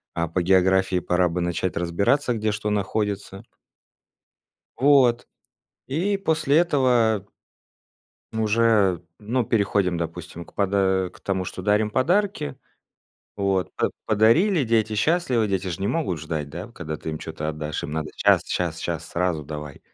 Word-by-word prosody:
а 85 0 0
по 90 +3 -1
географии 95 0 +3
пора 90 0 +1
бы 90 +2 -2
начать 85 +1 -2
разбираться, 100 - +1
где 110 -1 -1
что 105 0 -3
находится. 100 -1 -2 1.3
Вот 130 -3 +4 0.6
и 185 +9 0
после 160 -6 +1
этого 125 - +2 1.1
уже, 110 -4 +2 0.2
ну, 115 +3 -1
переходим, 100 -5 +1
допустим, 85 0 -6
к - - -20
пода 95 -2 +1
к - - -16
тому, 95 -1 -2
что 95 - -6
дарим 105 +2 +2
подарки. 175 - 0 0.8
Вот. 95 -2 0
П - - +1 0.2
подарили, 135 - +4
дети 110 -1 +1
счастливы, 125 -2 +1
дети 95 -1 -1
ж 85 - -4
не 100 - -2
могут 125 - -1
ждать, 80 -1 -4
да, 85 +8 -7
когда 80 -6 -5
ты 80 - -6
им 80 - -5
чё-то 80 -1 -5
отдашь. 75 0 -4
Им 75 - -5
надо 80 -1 -3
щас, - - +4
щас, - - -2
щас, - - -3
сразу 85 -3 -1
давай. 75 -1 -7
100 Hz, 145 wpm, -24 LUFS, 85-115 Hz, 1.3 s, Вот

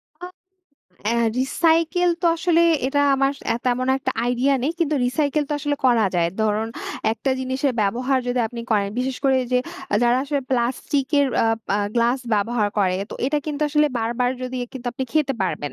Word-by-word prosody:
আ 355 +3 -8 0.8
অ্যা 235 - +1 0.2
recycle 330 +5 +2
তো 345 - +3
আসলে 335 0 +2 0.3
এটা 285 +2 +1
আমার 270 +1 +2 0.2
অ্যা 230 - +1
তেমন 250 +1 +1
একটা 260 - -2 0.2
আইডিয়া 250 +3 +2
নেই 300 - 0
কিন্তু 310 -2 +1
রিসাইকেল 295 +3 0
তো - - -2
আসলে 290 0 -1
করা 230 -4 +4
যায়। 170 -1 +2
ধরুন 220 +1 0 0.4
একটা 265 +4 -2
জিনিসের 260 +1 -1
ব্যবহার 250 +6 +1
যদি 245 - 0
আপনি 235 0 -7
করেন 205 -2 +2
বিশেষ 255 0 -1
করে, 265 -1 +4 0.2
যে 250 - +4 0.4
যারা 240 +1 +4
আসলে 285 -1 -1
প্লাস্টিক 260 +3 0
এর 280 - +3 0.2
আ - - +2 0.2
পা 200 - +1 0.2
গ্লাস 240 +2 +2 0.2
ব্যবহার 210 +1 +1
করে 185 -2 +2
তো - - -6
এটা 300 +2 +1
কিন্তু 300 0 -2
আসলে 300 0 +3
বারবার 240 +2 0
যদি 255 0 -4
এ - - -14
কিন্তু 260 -2 -8
আপনি 260 +2 -3
খেতে 290 -4 +1
পারবেন। 150 -5 -3
260 Hz, 185 wpm, -22 LUFS, 235-285 Hz, 0.8 s, করা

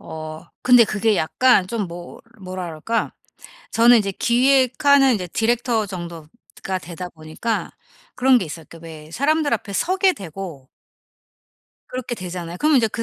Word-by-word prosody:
어 155 0 -8 0.2
근데 245 -2 +7
그게 215 0 +1
약간 195 +4 +3
좀 210 -1 -3
뭐 175 +1 -10 0.2
뭐라 185 -1 -6
그럴까? 165 +8 -2 0.6
저는 235 +1 +6
이제 200 -2 -1
기획하는 265 +3 +3
이제 180 -4 -3
디렉터 230 +1 0
정도가 175 +1 -7
되다 175 +3 -7
보니까 160 +8 -4 0.4
그런 255 0 +4
게 220 - -3
있어요. 160 0 -8
그니까 165 0 -14
왜 155 -1 -11
사람들 295 - +1
앞에 205 -2 -6
서게 370 - +2
되고 165 - -8 1.2
그렇게 250 -1 -4
되잖아요. 180 -3 -6
그럼 305 -1 +3
인제 225 -3 +3
그 230 - -4
200 Hz, 305 characters per minute, -21 LUFS, 170-245 Hz, 1.2 s, 근데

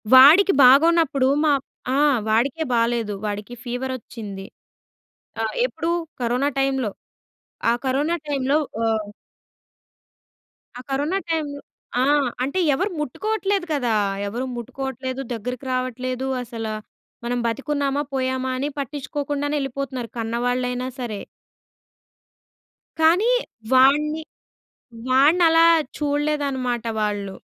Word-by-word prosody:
వాడికి 310 +10 +8
బాగోనప్పుడు 285 +1 +5 0.2
మా 310 - +4 0.4
ఆ! - - +2 0.3
వాడికే 250 +8 +1
బాలేదు. 230 -2 +1
వాడికి 210 +3 -4
ఫీవరొచ్చింది. 240 -5 -5 1.0
ఆహ్, 220 -1 -2
ఎప్పుడు, 335 -8 -3 0.3
కరోనా 245 +4 +1
టైమ్‌లో 265 -5 0 0.8
ఆ - - +3
కరోనా 285 +6 +1
టైమ్‌లో 280 0 +1 0.3
ఆహ్ 220 -2 0 1.7
ఆ - - -7
కరోనా 290 +7 0
టైమ్‌లో 295 -3 -2 0.4
ఆ! - - +4 0.4
అంటే 280 +8 -1
ఎవరు 380 +9 -1
ముట్టుకోవట్లేదు 400 - -1
కదా! 250 -6 +1 0.3
ఎవరు 240 +6 -3
ముట్టుకోవట్లేదు, 260 +1 -5
దగ్గరికి 250 +3 -5
రావట్లేదు. 255 +1 -2 0.2
అసలు 225 -2 -5 0.5
మనం 245 +1 -1
బతికున్నామా, 280 +3 -1
పోయామా 260 0 -1
అని 280 +3 -1
పట్టించుకోకుండానే 290 +1 -3
ఎళ్ళిపోతున్నారు. 270 -3 -4
కన్నవాళ్ళైనా 245 +2 -1
సరే. 220 -5 -4 1.8
కానీ 350 +9 +4 0.4
వాడిని 295 +4 +4 0.9
వాడినలా 325 +5 +5 0.3
చూడలేదన్నమాట 285 -5 -1
వాళ్ళు. 205 -2 -2
265 Hz, 90 wpm, -22 LUFS, 240-290 Hz, 1.8 s, వాడికి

